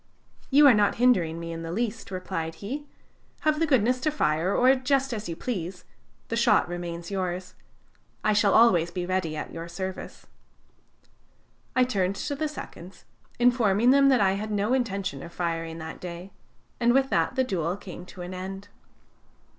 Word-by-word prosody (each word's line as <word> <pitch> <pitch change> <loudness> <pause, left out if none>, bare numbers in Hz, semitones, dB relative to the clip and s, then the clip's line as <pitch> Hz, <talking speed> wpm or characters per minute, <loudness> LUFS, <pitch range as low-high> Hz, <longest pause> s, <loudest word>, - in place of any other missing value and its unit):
"'You 290 +2 +6
are 275 - +9
not 210 -2 +3
hindering 185 -10 +2
me 170 0 -6
in 165 0 -5
the 165 0 -5
least,' 225 +3 -3
replied 180 -4 -4
he. 275 - -6 0.5
'Have 305 -1 +1
the 330 - +2
goodness 250 -2 +3
to 310 - 0
fire, 165 - 0
or 255 +5 +5
just 270 0 0
as 215 -4 -5
you 165 - -3
please 180 -4 -5 0.4
the 230 - -1
shot 225 -4 +3
remains 175 0 -6
yours; 185 -1 -3 0.7
I 215 - +3
shall 205 -1 +3
always 180 -8 +5
be 180 0 -4
ready 180 -4 -1
at - - -6
your 165 0 -6
service.' 185 +2 -6 1.5
"I 255 - +5
turned 195 -6 0
to 285 - -3
the 310 +2 -1
seconds, 185 - -10 0.3
informing 240 -2 +4
them 275 0 +5
that 260 -5 +4
I 190 -1 +4
had 205 +3 -3
no 210 +3 0
intention 195 - -1
of 170 +2 -10
firing 165 -2 -3
that 160 0 -7
day, 180 +2 -7 0.5
and 240 +1 +3
with 270 0 +2
that - - +1
the 260 - +3
duel 180 -6 -2
came 180 -3 -9
to 180 - -9
an 180 +1 -7
end. 195 +2 -7
195 Hz, 175 wpm, -26 LUFS, 175-245 Hz, 1.5 s, are